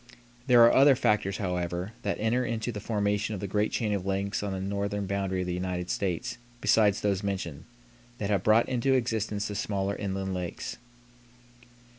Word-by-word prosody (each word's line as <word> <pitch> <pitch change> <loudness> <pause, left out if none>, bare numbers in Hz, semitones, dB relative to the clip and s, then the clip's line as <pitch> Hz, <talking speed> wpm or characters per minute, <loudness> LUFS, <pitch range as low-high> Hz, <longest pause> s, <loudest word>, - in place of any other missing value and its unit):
There 120 -2 +7
are 115 - +7
other 135 0 +7
factors, 105 -4 +1
however, 90 0 -2
that 100 - -2
enter 115 +4 +1
into 115 0 -2
the 105 - -5
formation 105 0 -1
of - - -5
the 100 - -4
great 105 +2 0
chain 110 -3 0
of 100 -3 -1
lakes 100 +1 -1
on 100 -1 -3
the 95 - -3
northern 100 +1 -2
boundary 95 -1 -1
of - - -2
the 90 - -2
United 90 0 -3
States 100 +6 -2 0.2
besides 105 -3 +3
those 100 -2 +1
mentioned, 95 -7 -4 0.5
that 105 -2 -2
have 100 -3 +2
brought 110 +4 +4
into 130 +1 +1
existence 110 -4 -1
the 105 - -5
smaller 100 -1 -1
inland 95 -1 -3
lakes. 90 -2 -5
100 Hz, 180 wpm, -28 LUFS, 95-110 Hz, 0.5 s, There